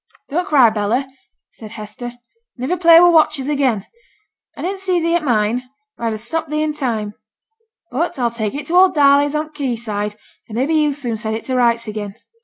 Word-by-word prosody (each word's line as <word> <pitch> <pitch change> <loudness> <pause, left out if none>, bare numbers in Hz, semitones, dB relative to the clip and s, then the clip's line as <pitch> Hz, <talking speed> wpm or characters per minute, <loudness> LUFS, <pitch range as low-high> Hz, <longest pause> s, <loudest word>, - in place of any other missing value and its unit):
'Don't 350 +6 -1
cry, 260 - +5
Bella,' 220 +5 -1 0.4
said 215 -1 -11
Hester. 215 +3 -7 0.4
'Niver 265 +9 -2
play 335 -1 +7
with 350 0 +6
watches 305 -4 +3
again. 265 -9 0 0.7
I - - -6
didn't 385 +2 -3
see 370 -2 0
thee 335 0 0
at 345 -2 +1
mine, 240 0 0 0.3
or 235 - -3
I'd 225 - -1
ha' - - -4
stopped 315 +8 -4
thee 305 0 0
in 305 -1 -1
time. 225 -8 -3 0.8
But 305 +7 -2
I'll 240 -2 0
take 220 0 -3
it 290 0 -5
to 330 - -5
old 370 -1 +5
Darley's 285 0 +4
on 305 +1 -2
th' - - -35
quay 270 -5 -2
side, 210 -2 -4 0.3
and 215 - -7
maybe 270 +7 0
he'll 300 -2 +2
soon 245 -5 -4
set 220 0 -3
it 225 - -5
to 260 - -2
rights 235 -2 +2
again. 210 -2 -5
260 Hz, 210 wpm, -18 LUFS, 225-310 Hz, 0.8 s, play